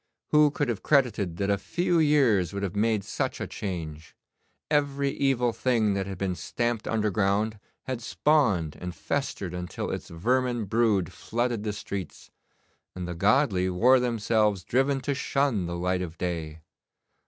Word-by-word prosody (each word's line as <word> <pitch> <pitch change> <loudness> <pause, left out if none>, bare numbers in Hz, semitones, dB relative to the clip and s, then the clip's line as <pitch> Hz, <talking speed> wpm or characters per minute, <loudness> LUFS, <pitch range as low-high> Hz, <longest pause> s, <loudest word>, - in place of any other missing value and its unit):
Who 150 -1 +5
could 145 -1 -2
have 120 -4 -2
credited 110 - +1
that 100 +1 0
a 100 - +1
few 175 - 0
years 130 - +3
would 100 0 -3
have 95 -1 -3
made 105 -1 +1
such - - -3
a - - -2
change? 80 -5 -6 0.6
Every 140 -2 +1
evil 125 -4 +1
thing 115 -3 +1
that 100 -1 -2
had 95 -2 -5
been 95 0 -1
stamped 120 +4 -2
underground 105 0 0 0.2
had 130 -2 -4
spawned 115 - +1
and 90 0 -6
festered 100 -10 -3
until 90 0 -4
its - - -5
vermin 120 +6 0
brood 105 -4 +1
flooded 120 -1 -2
the 105 0 -2
streets, 100 -3 -7 0.6
and 90 -1 -5
the 90 - -4
godly 100 - +2
wore 125 +9 +5
themselves 110 -5 +1
driven 135 +2 +1
to 140 +2 -1
shun 135 -8 0
the 85 0 -4
light 90 +1 0
of 85 -2 -6
day. 80 -3 -4
105 Hz, 155 wpm, -27 LUFS, 90-130 Hz, 0.6 s, Who